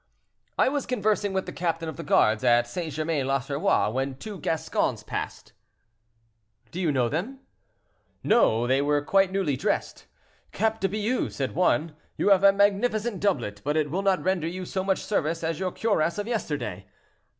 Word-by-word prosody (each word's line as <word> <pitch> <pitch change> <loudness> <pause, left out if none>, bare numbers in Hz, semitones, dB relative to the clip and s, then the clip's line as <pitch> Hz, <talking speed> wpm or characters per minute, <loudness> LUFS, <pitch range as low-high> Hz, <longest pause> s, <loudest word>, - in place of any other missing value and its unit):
"I - - +4
was 280 0 -1
conversing 210 -4 0
with 190 0 -1
the - - -6
captain 165 -1 -2
of 160 - -5
the - - -6
guards 110 +2 +3
at 120 -1 +4
St. 160 +6 -5
Germain 155 -2 -1
l'Auxerrois, 135 - +1
when 135 +2 -2
two 205 +4 -8
Gascons 160 -1 -1
passed—" - - -6 1.2
"Do 180 - -4
you 165 -4 +2
know 130 -4 +1
them?" 210 - -4 0.8
"No; 120 - +3
they 130 +2 +2
were 145 0 +1
quite 195 +1 +3
newly 190 -8 0
dressed. - - -2 0.5
'Cap 220 +2 0
de 195 - 0
Bious!' 215 +5 -1
said 135 -2 -2
one, 165 -2 +1 0.2
'you - - +2
have 195 -1 +5
a 200 - +8
magnificent 205 +2 +1
doublet, 105 - -1
but 150 +2 0
it 150 -2 0
will 185 +4 -1
not 195 -2 +1
render 185 -3 0
you 180 +2 -5
so 190 +1 -3
much 190 0 -1
service 165 -5 -1
as 160 0 -2
your 185 -1 -1
cuirass 185 -7 0
of 205 - -2
yesterday.' 135 - -3
175 Hz, 175 wpm, -26 LUFS, 145-200 Hz, 1.2 s, a